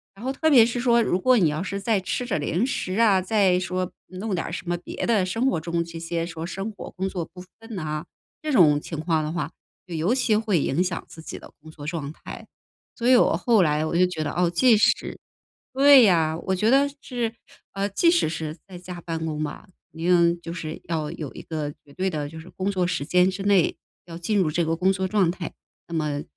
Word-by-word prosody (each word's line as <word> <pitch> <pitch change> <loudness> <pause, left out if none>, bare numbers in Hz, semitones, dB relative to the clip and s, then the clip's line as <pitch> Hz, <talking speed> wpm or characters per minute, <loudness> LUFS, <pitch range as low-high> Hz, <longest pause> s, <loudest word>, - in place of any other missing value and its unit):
然 210 +5 -10
后 265 - -1
特 315 +3 +1
别 240 -6 +8
是 240 +1 -2
说， 235 -1 +4
如 190 -5 +1
果 255 +5 +4
你 175 -7 +4
要 155 +4 -2
是 200 0 -4
再 215 +1 +1
吃 250 +6 -2
着 240 - -1
零 165 +9 0
食 190 -8 -3
啊， 205 -5 +5
再 190 -1 +3
说 185 0 -2 0.2
弄 190 +2 -4
点 170 - -2
儿 - - -6
什 175 - -6
么 175 - 0
别 175 - -5
的 215 -5 +2
生 225 +8 0
活 165 - -1
中 170 +1 -1
这 170 0 -9
些 165 0 -3
说 165 -1 -6
生 195 +4 -4
活 200 - -9
工 190 +1 -3
作 180 -3 -3
不 180 +2 -13 0.2
分 225 0 -11
呐。 155 -2 -4 0.4
这 310 - -2
种 155 - +5
情 160 -1 -6
况 160 -1 0
的 155 - -3
话， 165 -2 -3 0.4
就 175 - -6
尤 165 +8 +1
其 250 -4 +2
会 210 -7 +1
影 155 +7 +1
响 180 -2 -3
自 160 - -12
己 - - -8
的 - - -14
工 155 +1 -12
作 150 -2 -10
状 155 -4 -4
态。 - - -10 0.5
所 235 - -1
以 255 - +7
我 245 - +4
后 230 -4 +3
来 150 -1 +1
我 165 +2 -1
就 180 - +5
觉 175 -3 -5
得， 145 - -2
哦， 175 +1 +2
即 225 +8 +4
使 210 - +1 0.5
对 275 +1 +7
呀， 165 -6 +3
我 190 - +2
觉 210 +4 +1
得 280 +1 +4
是， 240 -5 -3 0.4
呃， 195 0 -1
即 270 - +3
使 340 - +3
是 160 0 -4
在 190 - -11
家 180 0 -8
办 165 -1 -4
公 155 -1 -2
吧， 155 - -6 0.2
一 165 0 -8
定 170 -1 +3
就 165 - -7
是 160 -2 -6
要 155 -3 -2
有 155 -5 -6
一 - - -8
个 155 -2 -4
绝 140 - -17
对 190 +1 0
的 150 -4 -3
就 160 +2 -9
是 160 - -12
工 190 +2 -2
作 185 -3 0
时 140 -5 -2
间 180 +3 +4
之 190 +1 -5
内， 200 -4 +3 0.3
要 165 -1 -8
进 200 +5 0
入 175 -5 +2
这 170 +2 0
个 165 +1 0
工 185 +3 +2
作 190 0 -1
状 190 -3 +2
态。 175 -1 -5 0.3
那 170 - -9
么 150 -2 -1
180 Hz, 260 characters per minute, -24 LUFS, 160-205 Hz, 0.5 s, 别